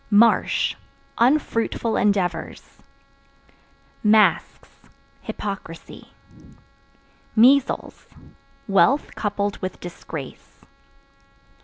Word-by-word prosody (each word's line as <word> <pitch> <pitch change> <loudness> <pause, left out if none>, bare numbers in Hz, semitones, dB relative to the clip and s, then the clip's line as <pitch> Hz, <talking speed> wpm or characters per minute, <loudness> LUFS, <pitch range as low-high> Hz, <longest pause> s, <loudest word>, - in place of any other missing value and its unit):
Marsh 225 +2 +3 0.5
Unfruitful 235 -3 +1
endeavors. 195 -4 -2 1.2
Masks 215 0 +2 0.5
Hypocrisy. 195 -5 -8 1.3
Measles 260 +4 +2 0.6
Wealth 200 +9 +2
coupled 205 -1 -2
with 185 -1 -6
disgrace. 160 -5 -9
210 Hz, 50 wpm, -22 LUFS, 190-230 Hz, 1.3 s, Marsh